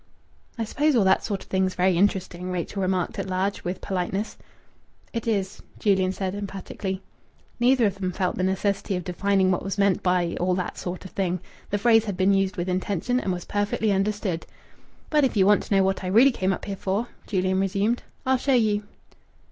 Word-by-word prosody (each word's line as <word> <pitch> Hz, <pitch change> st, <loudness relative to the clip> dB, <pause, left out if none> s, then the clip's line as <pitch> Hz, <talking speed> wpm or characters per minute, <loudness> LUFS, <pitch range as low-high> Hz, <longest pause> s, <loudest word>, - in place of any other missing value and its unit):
"I 230 Hz, -, -1 dB
suppose 290 Hz, +6 st, +1 dB
all 225 Hz, -, +4 dB
that 190 Hz, 0 st, +3 dB
sort 200 Hz, -3 st, -3 dB
of -, -, -21 dB
thing's 190 Hz, -1 st, +1 dB
very 180 Hz, 0 st, +3 dB
interesting," 185 Hz, -1 st, 0 dB
Rachel 180 Hz, +2 st, -3 dB
remarked 185 Hz, -2 st, -1 dB
at -, -, -3 dB
large, 190 Hz, +2 st, -1 dB
with 180 Hz, +1 st, -4 dB
politeness. 190 Hz, +2 st, -2 dB, 0.8 s
"It 230 Hz, -1 st, -3 dB
is," 200 Hz, -3 st, -1 dB, 0.2 s
Julian 190 Hz, -3 st, +2 dB
said 190 Hz, -1 st, -3 dB
emphatically. 195 Hz, -1 st, -5 dB, 0.6 s
Neither 245 Hz, 0 st, +4 dB
of 195 Hz, -1 st, -1 dB
them 185 Hz, -1 st, -1 dB
felt 185 Hz, 0 st, -1 dB
the -, -, -2 dB
necessity 190 Hz, +1 st, 0 dB
of 180 Hz, -, -3 dB
defining 190 Hz, +1 st, +1 dB
what 180 Hz, -, 0 dB
was 195 Hz, +1 st, -4 dB
meant 200 Hz, -2 st, +3 dB
by 180 Hz, -2 st, +1 dB
"all 180 Hz, +1 st, +1 dB
that 180 Hz, -1 st, -3 dB
sort 180 Hz, +1 st, -5 dB
of 190 Hz, -, -9 dB
thing." 185 Hz, -2 st, -1 dB, 0.3 s
The 205 Hz, -, 0 dB
phrase 225 Hz, +1 st, +4 dB
had 200 Hz, -4 st, -3 dB
been 190 Hz, +1 st, +4 dB
used 195 Hz, -1 st, +1 dB
with 175 Hz, +1 st, -2 dB
intention 190 Hz, +6 st, 0 dB
and 195 Hz, -, -2 dB
was 175 Hz, -1 st, -4 dB
perfectly 205 Hz, +1 st, 0 dB
understood. 195 Hz, -3 st, -1 dB, 0.6 s
"But 300 Hz, -2 st, +4 dB
if 255 Hz, -4 st, +1 dB
you 190 Hz, -, +5 dB
want 205 Hz, +1 st, +5 dB
to 200 Hz, -, 0 dB
know 195 Hz, -, +5 dB
what 190 Hz, 0 st, 0 dB
I -, -, -3 dB
really 230 Hz, +9 st, +6 dB
came 190 Hz, -5 st, 0 dB
up 190 Hz, -, -3 dB
here 200 Hz, -, -3 dB
for," 200 Hz, +6 st, -1 dB, 0.2 s
Julian 185 Hz, -1 st, +1 dB
resumed, 200 Hz, +5 st, +1 dB, 0.2 s
"I'll 260 Hz, 0 st, +3 dB
show 270 Hz, +1 st, +2 dB
you." 215 Hz, -3 st, +2 dB
195 Hz, 205 wpm, -25 LUFS, 185-205 Hz, 0.8 s, really